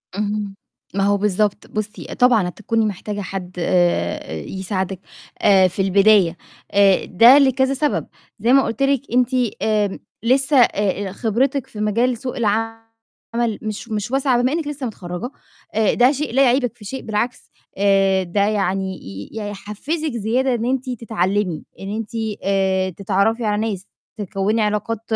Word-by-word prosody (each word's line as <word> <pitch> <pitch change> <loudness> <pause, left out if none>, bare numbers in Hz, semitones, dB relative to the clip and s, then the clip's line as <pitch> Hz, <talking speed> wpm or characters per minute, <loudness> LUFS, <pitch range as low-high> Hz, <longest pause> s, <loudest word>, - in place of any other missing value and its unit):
اهم، 205 -1 -2 0.4
ما 195 0 0
هو 205 0 +3
بالضبط 205 0 0
بُصّي 215 +1 -5
آآ - - -5
طبعًا 240 -7 +3
هتكوني 220 +4 -1
محتاجة 205 +1 -4
حد 185 -1 -6
آآ 175 - 0
يساعدِك 190 - -4 0.4
آآ 195 -2 +5
في 185 +2 -3
البداية 195 -2 +4 0.3
آآ 200 -1 +4
ده 235 +8 +7
لكذا 265 -1 +3
سَبب 290 +2 -1 0.3
زي 235 +5 +3
ما 275 - +6
قُلت 230 +3 -2
لِك 275 -2 +2
أنتِ 250 0 +3 0.3
آمم 210 -2 0 0.2
لسه 270 +4 +3
آآ 205 -4 +2
آآ - - -6
خبرتِك 245 +6 0
في 210 - -10
مجال 230 +4 +1
سوق 255 +1 -5
العمل 225 +1 -3
مش 215 +1 -5
مش 215 +1 -3
واسعة 265 -2 +2
بما 255 +2 +1
إنِّك 320 -2 -2
لسه 290 -3 -4
متخرّجة، 180 0 -5 0.5
آآ 220 -2 +3
ده 245 +2 +5
شيء 290 -3 -3
لا 270 +2 +5
يعيبِك 245 -2 +2
في 210 - -13
شيء، 265 +6 -5
بالعكس 225 +3 -3 0.3
آآ 195 -1 +3
ده 185 +3 -1
يعني 195 -2 0
ي 95 +1 -8
يحفّزِك 215 +9 -4
زيادة 240 +3 0
إن 235 -1 -1
أنتِ 260 +1 -1
تتعلّمي، 205 -7 -1 0.2
إن 195 +2 -5
أنتِ 225 -1 -5 0.3
آآ 190 -1 +1
تتعرّفي 200 +5 0
على 210 0 0
ناس، 195 -2 -6 0.3
تكوّني 205 +2 -1
علاقات 210 +1 -1
210 Hz, 155 wpm, -20 LUFS, 195-245 Hz, 0.5 s, ده